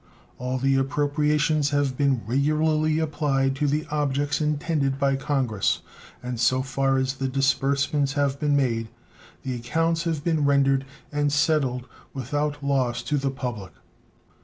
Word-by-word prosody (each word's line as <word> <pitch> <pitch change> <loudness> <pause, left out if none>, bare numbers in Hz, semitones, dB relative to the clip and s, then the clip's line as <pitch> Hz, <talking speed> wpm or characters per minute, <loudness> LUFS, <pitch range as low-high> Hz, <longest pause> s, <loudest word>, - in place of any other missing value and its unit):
All 125 +1 -2
the 135 +1 +2
appropriations 150 +2 +1
have 145 -2 0
been 135 -3 +1
regularly 155 +5 +1
applied 145 -4 0
to 145 - +1
the 150 +2 0
objects 145 0 0
intended 150 -2 0
by 135 0 +2
Congress, 130 -7 0 0.4
and 125 -1 -4
so 130 +2 +2
far 135 0 0
as 130 0 0
the 135 0 -3
disbursements 140 +1 +1
have 140 -1 0
been 145 -1 +2
made 115 -5 0 0.5
the 130 - -3
accounts 165 +8 0
have 160 -4 -1
been 160 -3 +1
rendered 135 -1 +3 0.3
and 145 -1 0
settled 140 -4 +1 0.3
without 145 +3 -2
loss 130 -4 0
to 145 +5 0
the 135 0 0
public. 120 - -5
140 Hz, 140 wpm, -25 LUFS, 130-150 Hz, 0.5 s, rendered